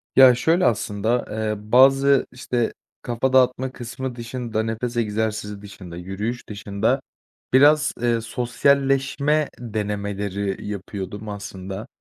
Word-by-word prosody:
Ya, 130 Hz, -2 st, +8 dB
şöyle 165 Hz, +8 st, +2 dB
aslında, 110 Hz, +2 st, 0 dB
eee, 110 Hz, 0 st, -1 dB, 0.2 s
bazı, 135 Hz, +2 st, +6 dB
işte, 120 Hz, -1 st, -2 dB, 0.3 s
kafa 120 Hz, +2 st, -1 dB
dağıtma 130 Hz, 0 st, +3 dB
kısmı 125 Hz, 0 st, -6 dB
dışında, 120 Hz, -2 st, -3 dB
nefes 115 Hz, +2 st, -3 dB
egzersizi 105 Hz, -2 st, -2 dB
dışında, 95 Hz, -4 st, -10 dB
yürüyüş 100 Hz, +7 st, -4 dB
dışında 105 Hz, +5 st, -1 dB, 0.5 s
biraz, 145 Hz, +3 st, +5 dB
eee, 120 Hz, -1 st, +1 dB
sosyalleşme 135 Hz, +5 st, +1 dB
denemeleri 100 Hz, -3 st, -3 dB
yapıyordum 100 Hz, +1 st, -6 dB
aslında. 100 Hz, 0 st, -7 dB
115 Hz, 105 wpm, -23 LUFS, 105-130 Hz, 0.5 s, Ya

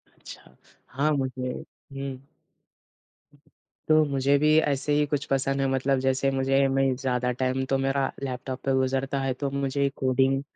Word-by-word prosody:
अच्छा। -, -, -13 dB, 0.3 s
हाँ 140 Hz, +4 st, 0 dB
मुझे 130 Hz, -1 st, -3 dB, 0.4 s
हुँ। 135 Hz, -1 st, -5 dB, 1.7 s
तो 155 Hz, 0 st, +5 dB
मुझे 140 Hz, +1 st, +2 dB
भी 155 Hz, +1 st, +4 dB
ऐसे 145 Hz, -1 st, 0 dB
ही 150 Hz, 0 st, +3 dB
कुछ 145 Hz, 0 st, -2 dB
पसंद 135 Hz, 0 st, 0 dB
है। 135 Hz, -, +1 dB
मतलब 135 Hz, 0 st, +1 dB
जैसे 130 Hz, +1 st, +1 dB
मुझे 135 Hz, +1 st, +2 dB
मैं 135 Hz, 0 st, +1 dB
ज़्यादा 125 Hz, -1 st, -1 dB
टाइम 130 Hz, 0 st, 0 dB
तो 135 Hz, -, +2 dB
मेरा 135 Hz, 0 st, 0 dB
लैपटॉप 130 Hz, 0 st, -4 dB
पे 135 Hz, -, +2 dB
गुज़रता 135 Hz, +1 st, 0 dB
है। 135 Hz, -1 st, -1 dB
तो 140 Hz, +2 st, -3 dB
मुझे 140 Hz, 0 st, 0 dB
कोडिंग 135 Hz, +1 st, +1 dB
135 Hz, 155 wpm, -26 LUFS, 130-140 Hz, 1.7 s, तो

